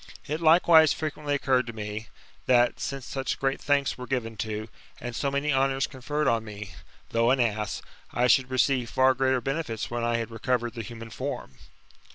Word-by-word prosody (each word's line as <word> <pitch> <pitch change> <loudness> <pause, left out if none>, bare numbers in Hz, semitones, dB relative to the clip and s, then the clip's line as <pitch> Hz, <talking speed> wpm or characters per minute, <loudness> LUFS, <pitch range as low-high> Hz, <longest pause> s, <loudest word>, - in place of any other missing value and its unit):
It 155 +3 -3
likewise 160 -1 +6
frequently 150 -2 -2
occurred 130 -3 +1
to 115 - -5
me, 105 0 -5 0.4
that, 120 -1 +4
since 135 -2 -4
such 135 -1 -3
great 135 0 0
thanks 140 -2 +1
were 125 - -6
given 115 -4 -2
to, 110 +1 -3 0.3
and 120 0 -6
so 140 - 0
many 140 +2 0
honours 135 0 +2
conferred 145 +2 -2
on 115 -2 +2
me, 105 -3 -8 0.4
though 115 +1 +3
an 130 +1 +3
ass, 105 -3 -1 0.3
I 120 - +1
should 125 +1 +4
receive 130 -1 +1
far 130 0 +4
greater 130 0 +1
benefits 135 -5 -3
when 120 0 -2
I 120 0 +1
bad 115 0 -4
recovered 120 +1 -1
the 115 - -5
human 115 +1 -9
form. 110 - -5
125 Hz, 185 wpm, -27 LUFS, 115-135 Hz, 0.4 s, likewise